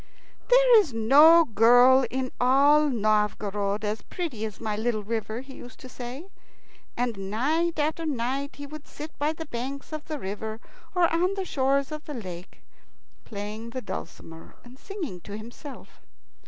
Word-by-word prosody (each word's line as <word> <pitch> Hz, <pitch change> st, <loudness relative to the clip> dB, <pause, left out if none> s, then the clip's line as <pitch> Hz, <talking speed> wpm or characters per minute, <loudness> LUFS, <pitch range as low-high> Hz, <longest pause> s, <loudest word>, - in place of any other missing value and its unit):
"There -, -, +7 dB
is 330 Hz, -, -1 dB
no 300 Hz, +9 st, +7 dB
girl 245 Hz, +3 st, +5 dB
in 260 Hz, 0 st, -3 dB
all 285 Hz, +4 st, +5 dB
Novgorod 210 Hz, -2 st, 0 dB
as 210 Hz, +1 st, -2 dB
pretty 305 Hz, -, -5 dB
as 215 Hz, -2 st, -7 dB
my 215 Hz, -2 st, -2 dB
little 220 Hz, 0 st, -1 dB
river," 220 Hz, +1 st, -3 dB
he 270 Hz, 0 st, -12 dB
used 250 Hz, -1 st, -12 dB
to 255 Hz, -, -10 dB
say, 250 Hz, +6 st, -8 dB, 0.7 s
and 225 Hz, -6 st, -2 dB
night 315 Hz, +10 st, 0 dB
after 310 Hz, +2 st, -1 dB
night 275 Hz, +1 st, -2 dB
he 285 Hz, -, -8 dB
would 305 Hz, +1 st, -10 dB
sit 305 Hz, +1 st, -9 dB
by 295 Hz, +2 st, +1 dB
the 320 Hz, 0 st, -7 dB
banks 275 Hz, +3 st, -6 dB
of 310 Hz, -1 st, -5 dB
the 310 Hz, -1 st, -4 dB
river 215 Hz, 0 st, -5 dB, 0.4 s
or 355 Hz, -1 st, +4 dB
on 360 Hz, +4 st, +1 dB
the 385 Hz, -1 st, -3 dB
shores 275 Hz, -1 st, 0 dB
of 305 Hz, 0 st, -7 dB
the 295 Hz, -, -6 dB
lake, 180 Hz, -6 st, -9 dB, 0.6 s
playing 210 Hz, +2 st, -6 dB
the 255 Hz, +2 st, -5 dB
dulcimer 165 Hz, -4 st, -8 dB
and 250 Hz, +2 st, -15 dB
singing 340 Hz, -, -6 dB
to 205 Hz, +4 st, -8 dB
himself. 240 Hz, +6 st, -11 dB
255 Hz, 160 wpm, -26 LUFS, 215-300 Hz, 0.7 s, There